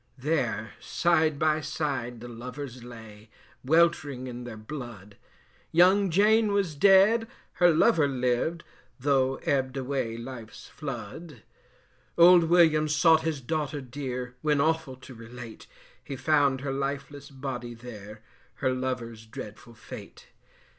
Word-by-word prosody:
There 125 -7 -1
side 160 -4 +1
by 155 +1 +1
side 140 -6 -3
the 120 - -8
lovers 125 +2 -8
lay 110 -3 -12 0.3
Weltering 145 -3 +2
in 125 -1 -7
their 115 -2 -8
blood: 110 -4 -9 0.6
Young 185 +4 +5
Jane 210 +4 +4
was 195 -5 0
dead, 200 +8 +5 0.3
her 175 - +7
lover 165 -1 +4
lived, 130 +5 -1 0.4
Though 135 -1 +2
ebb'd 135 -1 0
away 130 -4 -2
life's 115 -2 -9
flood. 135 - -8 0.7
Old 170 0 +7
Williams 155 -3 +4
sought 160 0 +5
his 160 -4 -2
daughter 150 +2 -2
dear, 125 -1 -6
When 150 -2 +1
awful 160 -2 0
to 130 +1 -13
relate, 115 0 -11 0.4
He 140 - -6
found 140 -2 +2
her 135 -1 -3
lifeless 140 +1 -4
body 130 -3 -6
there, 110 -2 -11 0.3
Her 130 -3 0
lover's 120 -4 -4
dreadful 110 +2 -10
fate. 110 - -11
135 Hz, 125 wpm, -27 LUFS, 120-155 Hz, 0.7 s, her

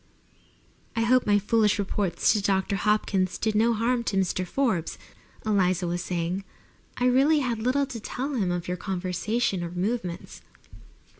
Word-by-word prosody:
"I 225 - +1
hope 250 +1 +3
my 205 -1 +5
foolish 210 0 +2
reports 195 -3 +1
to 215 - +1
Mr. 195 -1 0
Hopkins 195 -2 +1
did 220 -1 0
no 225 +2 +3
harm 235 +2 +1
to 195 - -1
Mr. 185 -1 0
Forbes," 225 - -1 0.5
Eliza 185 -4 +2
was 175 +1 -2
saying. 180 +2 -2 0.5
"I 250 - 0
really 275 +5 +4
had 240 -4 -1
little 255 +5 +1
to 255 -4 -7
tell 265 +6 -4
him 205 -8 0
of 175 -1 -2
your 180 0 -2
conversation 190 +2 -1
or 170 - -4
movements." 180 0 -4
205 Hz, 155 wpm, -26 LUFS, 180-235 Hz, 0.5 s, my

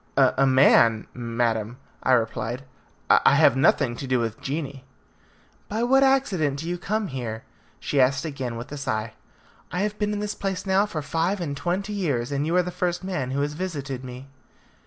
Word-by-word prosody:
"A 135 +1 +4
man, 115 -4 +5
madam," 115 -1 -1 0.2
I 130 - +2
replied; 115 +1 -1 0.4
"I - - +5
have - - +5
nothing 130 -2 +3
to 135 - -6
do 130 -1 +2
with 115 -1 -3
genii." 140 -2 -4 0.9
"By 220 +3 -1
what 270 +3 +4
accident 205 - +2
do 160 +3 -5
you 175 0 -3
come 210 +2 -2
here?" 115 -4 -5 0.4
she 140 - +1
asked 135 +3 +2
again 135 -6 -4
with 115 +3 -8
a 145 - -5
sigh. 110 -5 -3 0.6
"I 180 - -1
have 210 0 -2
been 210 0 0
in 210 - -2
this 210 0 -2
place 195 -2 -3
now 195 +2 +3
for 155 -7 -4
five 165 +7 -1
and 150 -5 -3
twenty 180 +8 -2
years, 145 -11 -1
and 140 +2 -1
you 170 - 0
are 180 - +4
the 180 - -5
first 180 0 -2
man 180 -9 -3
who 135 +2 -1
has 145 +1 -1
visited 145 -7 -4
me." 125 +1 -8
145 Hz, 190 wpm, -25 LUFS, 125-185 Hz, 0.9 s, man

